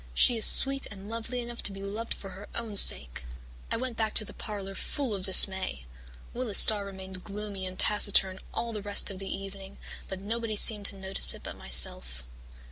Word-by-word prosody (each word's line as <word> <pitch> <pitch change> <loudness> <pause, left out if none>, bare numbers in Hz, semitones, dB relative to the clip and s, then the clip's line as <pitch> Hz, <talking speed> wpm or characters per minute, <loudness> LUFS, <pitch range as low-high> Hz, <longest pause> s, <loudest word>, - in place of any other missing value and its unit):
She 245 - +2
is 225 - +4
sweet 275 0 +2
and 200 -1 -13
lovely 230 +2 -7
enough 240 0 -9
to - - -5
be 195 0 -11
loved 215 +4 -6
for 195 - -12
her 200 +2 -13
own 225 -3 -5
sake.' 60 - +3 0.5
"I - - -3
went 250 -1 -7
back 220 -1 -4
to 215 - -1
the - - -13
parlour 200 -3 -8
full 255 +4 -6
of 190 -2 -6
dismay. 190 - +3 0.5
Willis 235 -5 -3
Starr 205 -2 +7
remained 190 -1 -11
gloomy 200 -2 -7
and 185 0 -10
taciturn 195 -2 +2
all 235 -1 -6
the 210 - -7
rest 205 0 0
of 190 - -11
the 195 - -9
evening, 195 0 -10 0.3
but 190 - -8
nobody 220 +2 -6
seemed 205 -1 +5
to - - -8
notice 190 0 +4
it - - -15
but - - -9
myself. - - 0
200 Hz, 200 wpm, -26 LUFS, 190-225 Hz, 0.5 s, Starr